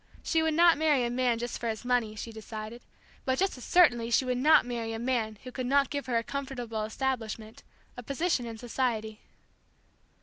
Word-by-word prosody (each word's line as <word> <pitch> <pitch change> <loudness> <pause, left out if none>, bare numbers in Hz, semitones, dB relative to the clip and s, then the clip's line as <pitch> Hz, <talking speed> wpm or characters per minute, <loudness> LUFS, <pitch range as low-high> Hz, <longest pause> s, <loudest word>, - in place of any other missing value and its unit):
She 325 - +1
would 320 -1 +1
not 335 -2 +6
marry 295 -6 +3
a 235 - -2
man 245 -1 +1
just 240 +1 -4
for 235 - -2
his 220 +2 -5
money, 245 -3 +1
she 230 +2 -6
decided, 220 +1 -8 0.4
but 260 0 0
just 390 +1 +1
as 250 - -11
certainly 240 -10 +4
she 240 +3 +3
would 250 -1 -1
not 305 0 +6
marry 230 -2 -3
a - - -3
man 230 -3 -1
who 255 - -8
could 250 0 -4
not 280 +1 +3
give 285 -2 -3
her 240 -2 +1
a 230 - 0
comfortable 245 -5 -4
establishment, 225 -2 -4 0.3
a 245 - -7
position 275 0 -1
in 225 -1 -7
society. 225 -2 -2
245 Hz, 200 wpm, -29 LUFS, 225-270 Hz, 0.4 s, not